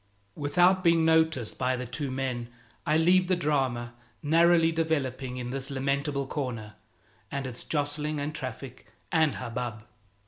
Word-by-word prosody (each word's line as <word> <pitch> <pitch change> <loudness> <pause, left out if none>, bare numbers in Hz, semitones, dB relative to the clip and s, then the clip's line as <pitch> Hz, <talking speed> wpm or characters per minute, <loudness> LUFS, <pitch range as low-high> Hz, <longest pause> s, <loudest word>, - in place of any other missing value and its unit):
Without 175 +6 +3
being 165 -2 +4
noticed 160 -7 +2
by 130 0 +1
the 125 0 -4
two 135 +4 -4
men 130 -2 -3 0.4
I 155 - +4
leave 180 +3 +4
the 185 - +3
drama 135 -7 0 0.3
narrowly 165 +2 +5
developing 135 -6 -1
in 125 -1 -4
this 135 0 -2
lamentable 140 +1 -1
corner 120 -7 -4 0.6
and 140 -1 -3
its 125 -2 -7
jostling 150 0 -2
and 145 +2 -3
traffic 130 -2 -7 0.2
and 160 -3 +3
hubbub. 120 -2 -4
140 Hz, 140 wpm, -28 LUFS, 125-160 Hz, 0.6 s, narrowly